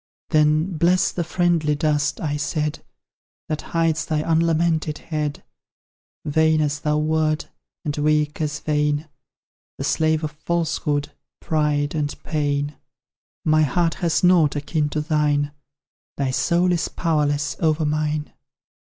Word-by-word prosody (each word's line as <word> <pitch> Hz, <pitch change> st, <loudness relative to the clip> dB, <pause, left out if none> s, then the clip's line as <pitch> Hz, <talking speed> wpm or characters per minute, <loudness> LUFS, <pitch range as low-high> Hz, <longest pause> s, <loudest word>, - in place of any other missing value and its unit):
Then 155 Hz, +3 st, +2 dB
"Bless 175 Hz, +3 st, +3 dB
the 175 Hz, -, -2 dB
friendly 170 Hz, -3 st, +1 dB
dust," 150 Hz, -1 st, 0 dB
I 150 Hz, -2 st, -2 dB
said, 150 Hz, +1 st, -2 dB, 0.7 s
"That 155 Hz, -1 st, -2 dB
hides 165 Hz, -1 st, 0 dB
thy 155 Hz, -1 st, 0 dB
unlamented 165 Hz, -1 st, +1 dB
head! 150 Hz, -2 st, -4 dB, 0.8 s
Vain 160 Hz, +1 st, +3 dB
as 145 Hz, -1 st, 0 dB
thou 150 Hz, 0 st, 0 dB
wert, 155 Hz, 0 st, 0 dB, 0.4 s
and 145 Hz, -1 st, -1 dB
weak 150 Hz, 0 st, +1 dB
as 150 Hz, -1 st, -2 dB
vain, 150 Hz, 0 st, 0 dB, 0.7 s
The -, -, -4 dB
slave 160 Hz, 0 st, +1 dB
of 155 Hz, -, -2 dB
Falsehood, 155 Hz, -2 st, -1 dB, 0.3 s
Pride, 150 Hz, -2 st, 0 dB
and 150 Hz, -2 st, -2 dB
Pain 145 Hz, -1 st, -1 dB, 0.7 s
My 155 Hz, 0 st, +4 dB
heart 165 Hz, +3 st, +2 dB
has 170 Hz, 0 st, 0 dB
nought 170 Hz, -5 st, +5 dB
akin 150 Hz, +1 st, -1 dB
to 150 Hz, +1 st, -2 dB
thine; 150 Hz, -2 st, +1 dB, 0.7 s
Thy 135 Hz, -2 st, 0 dB
soul 175 Hz, +6 st, +2 dB
is 170 Hz, -2 st, 0 dB
powerless 150 Hz, -3 st, 0 dB
over 155 Hz, -1 st, +1 dB
mine." 150 Hz, 0 st, -1 dB
155 Hz, 125 wpm, -22 LUFS, 150-160 Hz, 0.8 s, nought